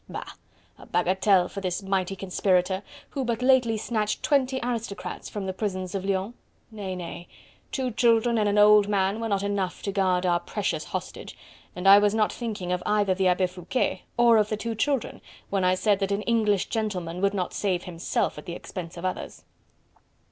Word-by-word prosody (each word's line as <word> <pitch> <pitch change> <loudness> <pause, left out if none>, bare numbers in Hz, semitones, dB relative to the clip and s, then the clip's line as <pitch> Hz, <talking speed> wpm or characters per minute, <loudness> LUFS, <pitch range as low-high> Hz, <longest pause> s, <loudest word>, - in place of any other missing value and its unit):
Bah! - - -5 0.6
a - - -13
bagatelle, 185 +1 +3
for 200 - -7
this 185 0 -2
mighty 195 -1 -1
conspirator, 185 0 +1 0.3
who 275 - -2
but 235 0 -2
lately 250 -4 +4
snatched 215 -1 -2
twenty 265 -3 +2
aristocrats 230 -4 -4
from 205 -2 -5
the 190 - -3
prisons 185 -2 -3
of 195 -2 -2
Lyons.... 195 +3 -1 0.4
Nay! 200 -4 -5
nay! 175 -1 -7 0.4
two 260 -2 -1
children 230 0 +3
and 210 -1 +2
an 205 - +1
old 210 0 +7
man 200 +1 +1
were 225 0 -3
not 200 -1 0
enough 200 -3 -2
to 200 - -2
guard 185 -2 +1
our 175 -1 +3
precious 175 -4 -3
hostage, - - -6 0.4
and 180 +2 -2
I 200 +1 +10
was 205 +1 +2
not 215 -1 +2
thinking 215 -7 -4
of 180 0 0
either 205 -2 +2
the 190 0 +1
Abbe 180 +1 +3
Foucquet 180 +7 -2 0.2
or 235 -1 +6
of 210 0 +1
the 215 - -1
two 230 +2 -3
children, 270 +3 -1 0.3
when 195 -2 +1
I 185 0 +3
said 200 +2 +2
that 195 0 -1
an 200 +1 -1
English 215 -4 +1
gentleman 185 -6 -3
would 200 0 +2
not 185 -2 -2
save 185 -3 -1
himself 170 -3 -2
at - - -13
the 170 - -4
expense 175 -2 -8
of 170 - -5
others." 185 - -4
200 Hz, 190 wpm, -26 LUFS, 185-220 Hz, 0.6 s, I